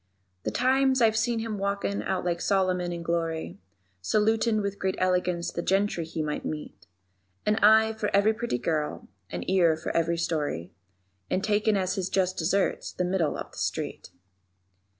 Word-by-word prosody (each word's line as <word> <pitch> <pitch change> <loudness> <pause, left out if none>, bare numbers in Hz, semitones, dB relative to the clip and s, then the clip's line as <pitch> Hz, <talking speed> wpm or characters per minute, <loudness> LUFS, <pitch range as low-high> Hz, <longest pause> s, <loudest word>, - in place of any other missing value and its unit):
_ - - -46
The - - +1
times 260 +1 +2
I've 225 -2 +4
seen 235 +1 +1
him 225 -2 -3
walkin' 200 0 -1
out 185 -1 -2
like 170 -1 -1
Solomon 185 -3 +1
in 170 -1 -5
glory, 165 -1 -2 0.4
Salutin' 215 - +2
with 200 0 -3
great 190 0 0
elegance 180 -1 0
the 170 - -3
gentry 195 -2 +1
he 160 -1 -3
might 150 -1 -3
meet; 150 -1 -6 0.6
An 210 +1 +2
eye 220 +1 +5
for 220 -1 -2
every 200 +2 +4
pretty 230 - -2
girl, 150 +4 -2 0.2
an 90 -1 -5
ear 175 -4 +3
for 160 - -4
every 170 0 +1
story, 150 - -2 0.6
And 190 - 0
takin' 210 0 +2
as 185 -1 0
his 190 -1 -1
just 185 -1 +1
deserts 190 +4 0
the 180 - -2
middle 175 -4 0
of - - -7
the - - -10
street. - - -3
185 Hz, 170 wpm, -27 LUFS, 170-215 Hz, 0.6 s, eye